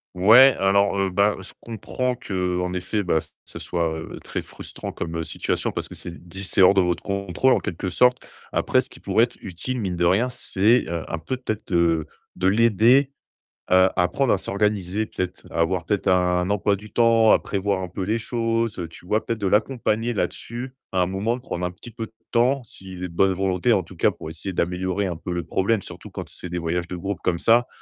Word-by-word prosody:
Ouais, 115 +9 +7
alors, 100 +1 +3
heu, 95 -1 +1
bah, 100 +3 +3
je - - -10
comprends 125 +3 -3
qu'en 90 -6 -2
effet, 95 +3 -2
bah, 80 -3 +2 0.3
ça - - -9
soit, 80 -2 -2
heu, - - -8
très - - -4
frustrant - - -8
comme, 85 0 -5
heu, 80 - -2
situation 80 - -2
parce - - -4
que - - -11
c'est 85 0 -8
d 95 +3 -8
c'est 95 - +1
hors 95 +1 +8
de 95 - +4
votre 90 -1 -1
contrôle 100 +6 +1
en - - +2
quelque 90 +2 -4
sorte. 125 +6 +2 0.2
Après - - +2
ce - - -10
qui - - -14
pourrait 115 +2 +3
être - - -16
utile, 110 +7 -4
mine 95 -4 -2
de 85 0 +1
rien, 105 +8 +3
c'est, 115 -1 +2
heu, 85 -1 -3
un 85 - -3
peu 125 +11 -4
peut-être 110 -4 -4
de 85 -2 +2 0.3
de 95 +1 0
l'aider, 115 +6 +4 0.6
heu, - - +6
à 95 - 0
apprendre 95 +9 +2
à - - +2
s'organiser, 100 +1 -1
peut-être, 90 -2 -5
à - - -3
avoir 90 0 0
peut-être 105 +1 -1
un 90 0 +2
emploi 100 0 +2
du 105 +2 -12
temps, 115 -2 +5
à - - +6
prévoir 100 -1 -1
un 90 - -4
peu 90 +2 -6
les 110 +4 0
choses, 115 -1 -1
heu, 85 - -3
tu 90 - -15
vois? 105 +4 0
Peut-être 115 -1 -2
de 100 - 0
l'accompagner 115 +2 +1
là-dessus 120 +4 -4 0.2
à 95 -1 +1
un - - +3
moment, 100 +6 -1
de - - -12
prendre 90 -8 -4
un 90 - -2
petit 115 +6 -13
peu 115 -1 -6
de 110 - -29 0.2
temps 125 +3 +3
s'il 95 -4 -10
est - - -2
de - - -13
bonne 95 +2 +3
volonté, 95 +4 +1
en 95 - +2
tout - - -14
cas, - - +3
pour 80 - -9
essayer 85 +4 -5
d'améliorer 90 +3 -1
un 90 -3 -2
peu 90 - -6
le 85 -1 -2
problème, 100 +2 +1
surtout - - -11
quand - - -7
c'est 90 - -8
des 90 - -3
voyages 85 +1 -2
de 90 - -4
groupe 100 +2 -4
comme 85 - 0
ça. 120 +5 +4
95 Hz, 230 wpm, -23 LUFS, 90-115 Hz, 0.6 s, hors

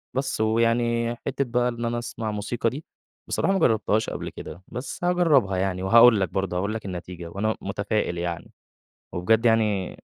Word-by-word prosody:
بس 135 -4 -1
ويعني 115 +1 +1
حتة 140 0 0
بقى 125 +1 +1
إن 120 0 -4
أنا 120 0 -1
اسمع 115 -2 -4
موسيقى 105 +3 -1
دي، 145 +6 -8 0.4
بصراحة 195 - +1
ما 190 - +1
جرَّبتهاش 110 -1 +2
قبل - - -5
كده، 90 - -10
بس 130 +7 -7
هاجرِّبها 155 - +3
يعني. 95 -1 -1
وهاقول 115 +2 +7
لك 95 -4 0
برضه، 95 -1 -2
هاقول 100 +4 -1
لك 110 -2 -5
النتيجة. 90 -2 -6
وأنا 110 +5 -1
متفائِل 100 -2 -2
يعني، 85 -1 -4 0.6
وبجد 110 +6 +2
يعني 105 -5 +2
110 Hz, 165 wpm, -25 LUFS, 95-120 Hz, 0.6 s, وهاقول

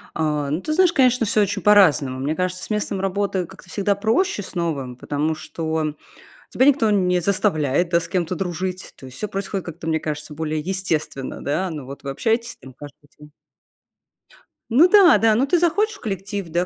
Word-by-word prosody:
А, 150 -3 -1
ну, 160 +5 -1
ты 310 - -2
знаешь, 360 0 +4
конечно, 250 -3 +3
всё 210 +1 +2
очень 200 -1 -1
по-разному. 160 -11 +4
Мне 145 +4 -1
кажется, 185 0 -2
с - - -8
местом 210 -2 -2
работы 195 -1 -1
как-то 180 - -15
всегда 200 0 0
проще 220 - 0
с - - -11
новым, 150 -8 -3
потому 145 +5 -2
что 160 -1 -3 0.5
тебя 260 - +2
никто 260 -7 +4
не 180 -3 +2
заставляет, 175 -4 +1
да, 170 - +3
с 170 - -7
кем-то 180 -1 -1
дружить. 185 +1 -4
То 130 - -12
есть 130 - -12
всё 210 - -3
происходит 195 -1 -4
как-то, 170 0 -8
мне 160 -1 0
кажется, 150 0 -5
более 155 0 -2
естественно, 160 -6 -3
да. 180 +7 -1
Ну 150 -4 -6
вот 140 +2 -10
вы 140 - -3
общаетесь 225 - -1
там 130 - -14
каждый 145 +2 -13
день 150 0 -15 1.4
Ну 280 +10 +6
да-да, 350 - +6
ну 250 +5 +2
ты 340 +5 +2
захочешь 405 +6 +1
в - - -15
коллектив, 200 -2 -4
да, 175 +2 0
185 Hz, 190 wpm, -22 LUFS, 155-210 Hz, 1.4 s, Ну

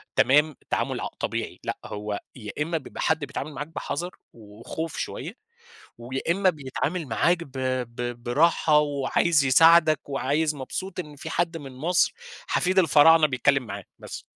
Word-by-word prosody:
تمام، 150 +1 +4
تعامل - - -1
ع - - -2
طبيعي - - -3
لأ، - - -3
هو 105 0 -4 0.2
يا 105 -5 -7
إمّا 165 +2 0
بيبقى 135 - -8
حد 160 0 +2
بيتعامل 145 +2 -6
معاك 145 +2 -5
بحَذَر 170 +2 -5 0.2
وخوف 115 +9 -7
شوية 165 - -5 0.6
ويا 125 +3 -5
إمّا 190 +1 +3
بيتعامل 155 +2 -3
معاك 170 +10 +2
ب 135 - -16 0.4
ب 120 -1 -5
براحة 150 +3 +3
وعايز 145 +1 +1
يساعدك 155 +2 +5
وعايز 145 +3 0
مبسوط 185 +7 -5
إن 150 -4 -7
في 160 +3 -8
حد 170 0 -1
من 140 -3 -9
مصر، 170 - +1 0.3
حفيد 185 +1 +2
الفراعنة 160 -1 +6
بيتكلّم 135 0 +2
معاه، 100 -3 -7 0.2
بس. - - -8
150 Hz, 150 wpm, -25 LUFS, 130-165 Hz, 0.6 s, الفراعنة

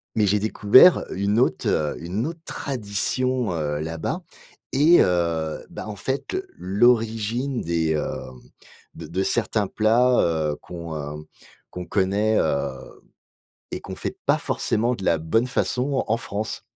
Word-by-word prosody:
mais 105 -2 +3
j'ai 105 +2 +2
découvert 110 - +6
une 100 +4 +1
autre, 130 - +1
heu, 75 -1 0
une 95 +7 -2
autre 165 0 -6
tradition, 125 - -2
heu, 75 -2 -2
là-bas. 80 +1 -3 0.5
Et 155 +6 +6
heu, 85 -3 0
bah, - - -7
en 105 - -5
fait, 135 - -3 0.2
l'origine 115 +4 +1
des, 80 -1 0
hem, 65 -4 -4 0.5
de - - -8
de 95 +4 -1
certains 110 -3 0
plats, 120 +4 +3
heu, 80 -3 0
qu'on, 85 -2 -7
heu, 75 +1 -6 0.4
qu'on 90 0 -7
connaît, 100 +3 +1
heu, 75 -3 0 1.0
et - - -4
qu'on - - -7
fait - - -5
pas - - +4
forcément 120 +3 0
de 95 - -7
la 85 - +3
bonne 95 +10 +1
façon 130 +1 0
en 115 - +1
France. 110 -1 -4
105 Hz, 145 wpm, -23 LUFS, 85-120 Hz, 1.0 s, découvert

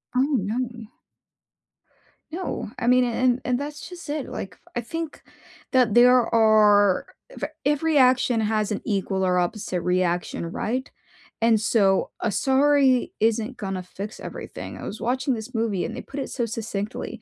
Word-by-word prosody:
Oh, - - +3 0.2
no. 230 +2 -3 1.4
No. 360 - -4
I 240 - -2
mean, 250 0 +5
and 245 +1 +1
and 250 +1 +1
that's 295 +1 -6
just 350 -4 -10
it. 295 -2 -3
Like, 190 - -6
f - - -23
I 240 - 0
think 325 +6 -6 0.5
that 250 -5 +3
there 250 0 +6
are 210 -3 +5 0.3
v - - -2 0.2
every 300 +1 +2
action 250 -3 +4
has 215 -1 0
an 205 - -2
equal 195 -3 -1
or 180 -1 +2
opposite 180 -1 -2
reaction, 180 -1 0
right? 255 +8 -2 0.5
And 225 -1 +4
so 200 -4 +2
a 225 - -1
sorry 270 +2 +3
isn't 225 +3 0
gonna 195 -4 -4
fix 200 +4 -8
everything. - - -7
I - - -9
was 215 - -6
watching 255 +2 0
this 225 +2 -8
movie, 220 -5 0
and - - -5
they - - -5
put 280 - -8
it 270 - -4
so 240 - -2
succinctly 215 -1 -5
230 Hz, 160 wpm, -24 LUFS, 205-255 Hz, 1.4 s, there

